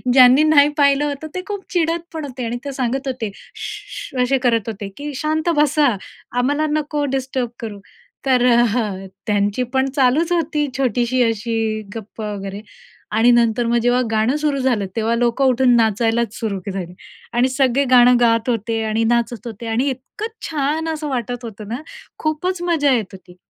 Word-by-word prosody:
ज्यांनी 255 +2 +7
नाही 295 -2 +6
पाहिलं 280 0 +4
होतं, 290 +1 -4
ते 365 - -2
खूप 405 -2 -4
चिडत 335 -1 +1
पण 315 -2 -4
होते 255 -3 -6
आणि 235 +1 -2
ते 280 - -3
सांगत 265 +1 -2
होते. 245 -5 -3 0.2
"Shoe, 420 -1 -7
shoe." 250 - +1
असे 270 +2 +2
करत 230 -3 +1
होते, 205 -2 -6
की 290 0 -5
"शांत 310 +4 -1
बसा, 300 0 +4 0.5
आम्हाला 285 +5 +1
नको 300 -1 -1
डिस्टर्ब 260 -2 -2
करु." 215 -3 -6 0.5
तर 255 -2 +3
अ, 230 -5 +2 0.2
त्यांची 205 +3 +1
पण 265 0 +2
चालूच 285 +5 +3
होती 310 -3 0
छोटीशी 250 -1 +1
अशी 225 -1 -2
गप्पा 215 -1 -6
वगैरे. 195 0 -6 0.5
आणि 230 +3 +5
नंतर 235 0 +3
मग 235 +1 +2
जेव्हा 245 +2 +2
गाणं 220 +4 +2
सुरू 295 -2 +1
झालं, 245 -6 +1
तेव्हा 225 0 +1
लोकं 240 +3 +1
उठून 255 -1 +4
नाचायलाच 225 0 +1
सुरू 210 -4 -3
झाली. 180 -2 -5 0.4
आणि 245 +2 +3
सगळे 265 0 +2
गाणं 250 0 +7
गात 230 0 +2
होते 225 -1 -1
आणि 220 +1 0
नाचत 235 0 0
होते 230 0 -8
आणि 240 +5 +1
इतकं 265 - -6 0.2
छान 310 +1 -1
असं 310 -1 -3
वाटत 245 -1 -3
होतं 220 -2 -8
ना, 240 +6 -4 0.4
खूपच 340 +4 -1
मजा 290 -4 +3
येत 230 -4 +1
होती. 180 -2 -13
245 Hz, 170 wpm, -20 LUFS, 225-285 Hz, 0.5 s, ज्यांनी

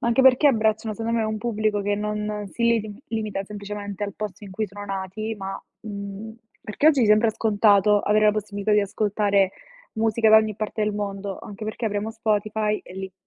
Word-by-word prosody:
Ma - - -2
anche 235 +3 +3
perché 265 +3 +6
abbracciano 220 -3 +2
secondo 230 +2 -1
me 220 - +1
un 215 0 -2
pubblico 215 -2 0
che 205 +1 0
non 210 0 -3
si 235 - -4
liti 225 -3 +1
limita 215 -3 -2
semplicemente 205 0 -6
al 200 -1 -6
posto 210 -1 -6
in 200 - -10
cui 215 +3 -2
sono 205 +1 -9
nati, 195 +3 -4
ma, 195 -1 -5 0.2
mhmm, 200 +1 -7 0.3
perché 215 +7 -1
oggi 285 -6 +5
sembra 215 +1 +4
scontato 210 -2 +4
avere 215 +1 +3
la 210 - +5
possibilità 210 0 -2
di 210 - +5
ascoltare 200 -1 +1 0.4
musica 220 0 +2
da 220 - +9
ogni 220 -1 +3
parte 215 +1 -3
del 210 - -1
mondo, 200 -1 -4
anche 210 +1 -8
perché 215 +2 -4
avremo 210 0 -1
Spotify 215 -1 0
e - - -13
lì 190 0 -6
210 Hz, 195 wpm, -24 LUFS, 205-220 Hz, 0.4 s, da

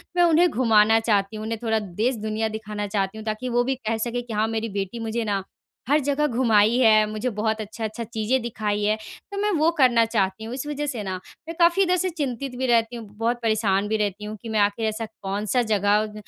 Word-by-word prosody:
मैं 350 - +4
उन्हें 340 +1 +5
घुमाना 225 -3 +4
चाहती 210 -2 0
हूँ, 215 - -5
उन्हें 225 -1 -3
थोड़ा 220 -1 +1
देश-दुनिया 215 +2 -2
दिखाना 210 -1 -5
चाहती 195 +1 -2
हूँ, 220 - -8
ताकि 215 +3 -3
वो 240 0 +2
भी 265 +1 -1
कह 225 -3 -2
सके 245 +1 -2
कि, 240 -2 -8
"हाँ, 215 +1 +1
मेरी 225 0 -2
बेटी 195 +5 -4
मुझे 225 +1 -2
ना, 200 -3 -1 0.5
हर 295 +2 +5
जगह 295 +1 +1
घुमाई 230 -2 +3
है, 215 -3 +5
मुझे 215 +4 -2
बहुत 220 +1 -1
अच्छा-अच्छा 220 +2 -5
चीज़ें 230 +3 -1
दिखाई 210 -3 -2
है।" 215 +1 +2 0.4
तो 400 - -5
मैं 420 0 +1
वो 315 +2 +4
करना 245 -4 +5
चाहती 205 -2 -1
हूँ। 230 +2 -6
इस 265 +2 -4
वजह 295 0 -3
से 235 -7 -3
ना, 190 -1 -3 0.3
मैं 330 - -5
काफ़ी 345 +3 +5
इधर 365 0 +2
से 370 +2 0
चिंतित 275 -5 -4
भी 260 +1 -1
रहती 230 0 +2
हूँ, 225 -3 -8
बहुत 235 +2 0
परेशान 210 -3 +1
भी 220 0 0
रहती 210 0 -2
हूँ 215 +1 -5
कि 230 - -7
मैं 215 -1 0
आखिर 205 +2 +1
ऐसा 220 +1 -2
कौन-सा 210 +2 -2
जगह 210 +1 +2
225 Hz, 225 wpm, -24 LUFS, 210-245 Hz, 0.5 s, उन्हें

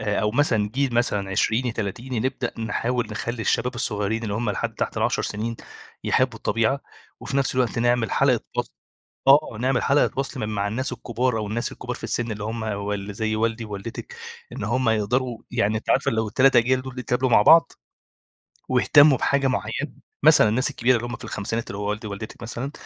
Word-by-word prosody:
آآ، 105 0 0
أو 105 - +1
مثلًا 115 -5 +1
جيل 135 -3 0
مثلًا 105 -5 0
عشريني، 115 +5 +1
تلاتيني 115 +3 -4
نبدأ 130 -2 -3
نحاول 120 +1 -1
نخَلّي 115 +2 -4
الشباب 125 +3 0
الصغيرين 110 -1 -2
اللي 105 -3 -3
هُم 110 0 -1
لحد - - -3
تحت - - -3
ال10 - - +1
سنين 115 +2 -3 0.5
يحبّوا 130 -2 +1
الطبيعة 115 +6 0 0.4
وفي 140 - -3
نفس 135 -1 +1
الوقت 125 -2 0
نعمل 120 -2 +2
حلقة - - +3 0.2
وصل - - -2 0.5
آه 140 -4 +5
نعمل 130 -1 +1
حلقة 140 +1 +3
وصل 135 -1 -3
م 105 - -2
مع 100 -1 -1
الناس 130 +5 -3
الكبار 120 0 -1
أو 105 - -3
الناس 110 +3 -2
الكبار - - -6
في - - -10
السن 120 -2 -1
اللي 105 0 -6
هُم 115 +1 -4
وال 100 -1 -3
اللي 100 +1 -7
زي 110 +1 -1
والدي 115 +1 -1
ووالدتِك 100 -2 -7 0.4
إن - - -5
هُم 120 +3 0
يقدروا 115 +3 0
يعني 110 -2 +1
أنتِ 110 - -4
عارفة - - +2
لو 110 -1 0
ال3 130 +4 +4
أجيال 130 +2 +3
دُول 130 -1 -8
يتقابلوا 125 +1 0
مع 110 - +6
بعض، 165 +8 +6 1.0
واهتَموا 140 +2 +5
بحاجة 140 -1 +1
معينة، 130 - -2 0.3
مثلًا 110 - +7
الناس 130 +6 +1
الكبيرة 130 -1 +2
اللي 120 +1 -3
هُم 120 - -5
في - - -10
خمسينات 115 +3 -3
اللي 100 - -5
هو 105 0 -3
والدي 110 +1 -4
و - - -6
والدتِك 100 +2 -8
مثلًا 120 +4 -4
115 Hz, 195 wpm, -24 LUFS, 110-130 Hz, 1.0 s, مثلًا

